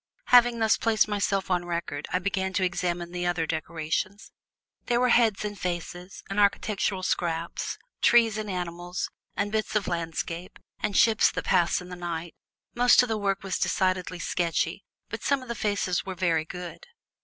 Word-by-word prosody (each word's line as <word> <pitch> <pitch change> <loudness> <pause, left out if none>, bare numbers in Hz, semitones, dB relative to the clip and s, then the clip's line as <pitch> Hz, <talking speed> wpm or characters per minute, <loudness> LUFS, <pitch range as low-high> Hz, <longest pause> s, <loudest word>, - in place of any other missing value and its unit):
Having 245 -1 +7
thus 220 -1 +3
placed 225 -2 +2
myself 200 -2 0
on 180 -1 +2
record, 170 -4 -4
I 180 - +2
began 190 0 -1
to 190 - +1
examine 175 -1 -1
the 175 0 -2
other 175 -2 0
decorations. 160 +5 -3 0.6
There 240 -1 +2
were 250 0 +3
heads 225 -4 +3
and 205 -2 -5
faces, 175 +1 -5
and 195 +1 -2
architectural 200 -1 +1
scraps, 170 -2 -2 0.2
trees 230 -3 +5
and 215 -1 -4
animals, 175 0 -4 0.2
and 205 - -1
bits 215 0 -1
of 210 - +1
landscape 170 0 -4 0.2
and 210 -2 -1
ships 225 -1 +5
that - - -4
pass 175 -2 +2
in 180 - -10
the 180 - -6
night. 170 -1 -5 0.4
Most 245 +1 +6
of 250 - -3
the 220 - 0
work 195 -1 -1
was 195 -1 -2
decidedly 185 -1 0
sketchy, 170 0 -1 0.3
but - - -5
some 280 -2 +1
of - - -12
the - - -1
faces 205 -5 0
were 190 -1 -5
very 165 -3 +1
good. 180 - -8
185 Hz, 175 wpm, -27 LUFS, 175-210 Hz, 0.6 s, Having